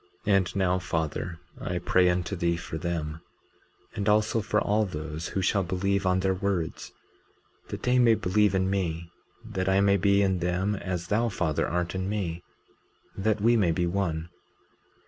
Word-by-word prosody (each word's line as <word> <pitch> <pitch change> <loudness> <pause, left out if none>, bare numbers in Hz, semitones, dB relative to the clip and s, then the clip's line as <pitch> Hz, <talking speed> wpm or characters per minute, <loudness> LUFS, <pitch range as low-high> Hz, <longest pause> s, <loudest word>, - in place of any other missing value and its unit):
19:23 105 - +3
And 95 -1 +1
now 95 -1 +2
Father, 80 0 -3 0.2
I 90 - -3
pray 90 +1 +3
unto 90 +2 -1
thee 85 -1 0
for 80 -1 -6
them, 80 -2 -3 0.7
and 105 -1 0
also 110 +1 +2
for 105 +1 +1
all 105 +1 +2
those 80 -3 -5
who 95 - -2
shall 100 +2 +2
believe 95 +2 0
on 95 0 +2
their 95 0 +2
words, 95 -3 -2 0.8
that - - -6
they 125 0 +3
may 115 -2 +6
believe 105 +1 +2
in 95 0 +1
me, 85 -3 -2 0.3
that 95 -4 -2
I 95 +1 +4
may 100 0 +4
be 100 +1 +3
in 95 -2 +1
them 90 +4 0
as 90 -3 -4
thou, 115 +3 +2
Father, 85 -6 -1
art 90 +1 -1
in 95 0 -2
me, 90 -5 -2 0.7
that 105 +1 0
we 115 +3 +4
may 100 -7 +3
be 85 +1 +1
one. 85 -3 -2
95 Hz, 175 wpm, -27 LUFS, 85-100 Hz, 0.8 s, may